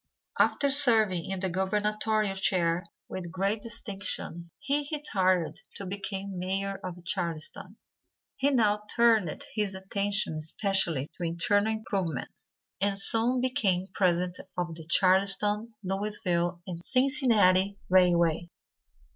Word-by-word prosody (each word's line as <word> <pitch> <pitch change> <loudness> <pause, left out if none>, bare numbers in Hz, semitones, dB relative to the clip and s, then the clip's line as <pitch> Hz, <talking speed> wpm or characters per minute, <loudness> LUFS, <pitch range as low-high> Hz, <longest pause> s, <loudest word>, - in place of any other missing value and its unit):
After 280 -1 +2
serving 220 - +3
in 190 -1 -3
the 190 - -1
gubernatorial 210 +2 0
chair 180 -2 0 0.2
with 180 -2 -6
great 195 +4 -1
distinction 200 -6 -4
he 285 +1 -2
retired 185 - 0
to 200 - -7
become 195 0 -5
Mayor 195 +2 -2
of 175 -1 -8
Charleston. 170 -5 -4 0.6
He 275 +1 +1
now 215 -6 +2
turned 225 -9 +2
his 205 -3 -1
attention 200 0 0
especially 165 -2 +1
to 180 - -6
internal 205 +6 +2
improvements, 195 - -5 0.3
and 200 0 +1
soon 230 +5 +5
became 195 -7 0
president 180 -1 0 0.2
of 175 -2 -2
the 160 -1 -11
Charleston, 200 +4 +2
Louisville 185 -3 -1
& - - -12
Cincinnati 215 -6 +2
Railway. 175 -2 +3
195 Hz, 115 wpm, -28 LUFS, 180-215 Hz, 0.6 s, soon